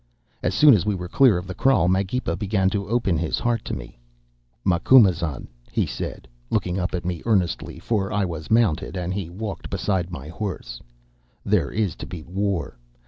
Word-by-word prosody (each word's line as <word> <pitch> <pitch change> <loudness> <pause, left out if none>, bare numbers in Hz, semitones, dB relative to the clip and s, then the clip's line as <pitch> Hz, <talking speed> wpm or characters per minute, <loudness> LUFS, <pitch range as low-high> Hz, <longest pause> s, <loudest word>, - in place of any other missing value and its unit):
"As - - 0
soon 150 -2 +8
as 100 - +3
we 105 0 0
were 90 -1 -5
clear 125 +1 +5
of 90 - -5
the 95 - -6
kraal 110 -4 +3
Magepa 95 +7 0
began 95 -2 +1
to 100 -1 -2
open 110 -8 +1
his 85 -2 -1
heart 120 -2 0
to - - -3
me. - - -10 0.7
"'Macumazahn,' 85 - +4 0.2
he - - +1
said, - - -6 0.2
looking 90 +1 0
up 90 0 -2
at 90 - -4
me 90 -2 -2
earnestly, 95 -9 0
for 95 +2 -1
I 100 -1 +1
was 80 -3 -6
mounted, 105 -6 +2
and 90 0 -2
he 95 -4 -4
walked 100 +3 -6
beside 95 -3 -1
my 70 -5 -7
horse, 80 - -5 0.6
'there - - +2
is 105 -6 -1
to - - -7
be 85 -4 -7
war. 95 -6 -2
95 Hz, 185 wpm, -23 LUFS, 85-105 Hz, 0.7 s, soon